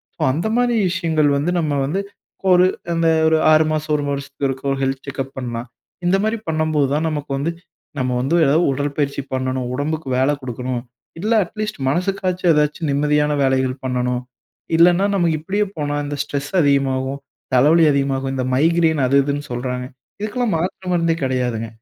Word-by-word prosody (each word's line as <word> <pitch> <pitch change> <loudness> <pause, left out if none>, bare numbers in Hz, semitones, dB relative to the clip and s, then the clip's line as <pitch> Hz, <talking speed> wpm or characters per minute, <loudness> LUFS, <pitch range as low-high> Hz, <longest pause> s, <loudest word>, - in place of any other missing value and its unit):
So - - -11
அந்த 165 +9 -1
மாதிரி 245 -1 +2
விஷயங்கள் 165 -5 +1
வந்து 155 +5 0
நம்ம 155 -3 0
வந்து, 175 +8 -1 0.5
ஒரு 180 0 +6 0.3
அந்த 165 0 +1 0.2
ஒரு 160 0 +4
6 155 0 +5
மாசம் 155 0 -1
1 145 -1 -1
வருஷத்திற்கோ, 140 -1 -3
ஹெல்த் 135 +1 -2
செக்கப் 135 -1 -5
பண்ணலாம். 120 -1 -4 0.4
இந்த 190 +2 +4
மாரி 220 +1 0
பண்ணம்போது 155 -3 +1
தான் 155 +2 0
நமக்கு 145 -2 -4
வந்து 150 +5 -1 0.5
நம்ம 130 0 0
வந்து 135 +6 +1
எதாவது 155 +5 +3
உடற்பயிற்சி 140 0 -2
பண்ணனும். 130 -1 -1
உடம்புக்கு 150 +2 -3
வேல 130 +3 +3
குடுக்கணும். 125 -1 -4 0.4
இல்ல 215 +6 0
அட்லீஸ்ட் 215 +1 -5
மனசுக்காச்சு 185 +3 -1
ஏதாச்சு 150 +1 +1
நிம்மதியான 150 +1 +2
வேலைகள் 130 0 0
பண்ணனும். 125 -1 -1 0.6
இல்லனா, 175 +3 +5
நாம 175 -4 +2
இப்டியே 195 +7 -1
போனா 145 -1 -2
இந்த 145 - -4
ஸ்ட்ரெஸ் 140 -1 -4
அதிகமாகும், 135 -1 +1 0.3
தலைவலி 155 +6 +5
அதிகமாகும். 135 -1 0
இந்த 130 - -1
மைக்ரைன் 160 +1 +3
அது 135 - +2
இதுனு 145 +1 -2
சொல்றாங்க, 125 +1 -3 0.4
இதுக்கெல்லாம் 215 +2 -1
மாத்திரை 180 +2 -4
மருந்தே 165 -1 +2
கிடையாதுங்க. 125 -3 -1
145 Hz, 155 wpm, -20 LUFS, 135-165 Hz, 0.6 s, ஒரு